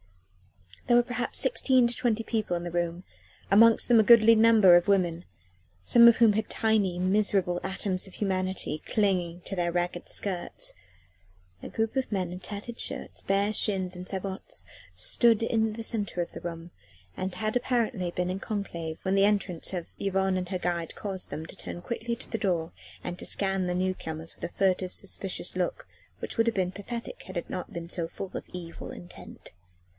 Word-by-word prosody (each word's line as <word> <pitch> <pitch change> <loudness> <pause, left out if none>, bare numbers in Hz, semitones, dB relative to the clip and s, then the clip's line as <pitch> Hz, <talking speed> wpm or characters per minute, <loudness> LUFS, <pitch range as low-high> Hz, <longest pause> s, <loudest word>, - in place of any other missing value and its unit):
There 240 - +5
were 240 - +5
perhaps 245 0 -2
sixteen 260 - +3
to 235 - 0
twenty 235 -3 0
people 215 -6 -1
in 170 - -6
the 175 - -5
room 175 +1 -2 0.5
amongst 225 +3 +6
them 235 -2 +6
a - - +6
goodly 230 0 +7
number 220 -5 +7
of 175 +2 +4
women, 180 -4 +1 0.6
some 235 - +7
of 235 - +7
whom 230 -3 +5
had 220 +1 -2
tiny, 210 -5 +1
miserable 185 -1 +2
atoms 190 0 -3
of 190 - -13
humanity 185 -5 -1
clinging 180 -5 0
to 195 - -5
their 175 -1 0
ragged 175 0 -2
skirts. 185 -4 -1 0.9
A - - -7
group 225 +2 -2
of 265 -3 -1
men 185 -4 -1
in 180 - -7
tattered 210 +5 -7
shirts, - - -5
bare 200 +2 +1
shins 190 -4 +1
and 180 +1 -8
sabots 195 - -6 0.3
stood 235 - +3
in 220 -1 +1
the 225 +1 -6
centre 205 -6 -2
of 170 - -4
the - - -9
room 170 0 -7 0.4
and 185 -1 -4
had 215 +3 -2
apparently 240 -6 0
been 180 +1 -2
in 190 - -4
conclave 170 -7 -4
when 190 - 0
the 195 - +4
entrance 200 -4 +3
of 175 -2 -3
Yvonne 190 -1 0
and 180 -1 -3
her 185 -2 -2
guide 170 -2 -2
caused 195 -3 -2
them 160 - -5
to 160 - -11
turn 175 - -7
quickly 235 +3 -3
to 240 - -8
the 225 - -3
door 170 -4 -1 0.3
and 175 0 -5
to - - -5
scan 195 -2 +1
the 180 - -1
new 185 +1 0
comers 160 -2 -7
with - - -18
a - - -6
furtive, 185 -1 +1
suspicious - - -3
look - - -2 0.3
which - - -4
would 230 0 +3
have 230 - +1
been 185 -2 0
pathetic 230 +4 -7
had 185 -1 -6
it 170 - -5
not 180 - -5
been 170 0 -6
so 170 -1 -1
full 190 +3 -7
of - - -4
evil 170 -2 -8
intent. 175 - -12
190 Hz, 190 wpm, -28 LUFS, 180-220 Hz, 0.9 s, goodly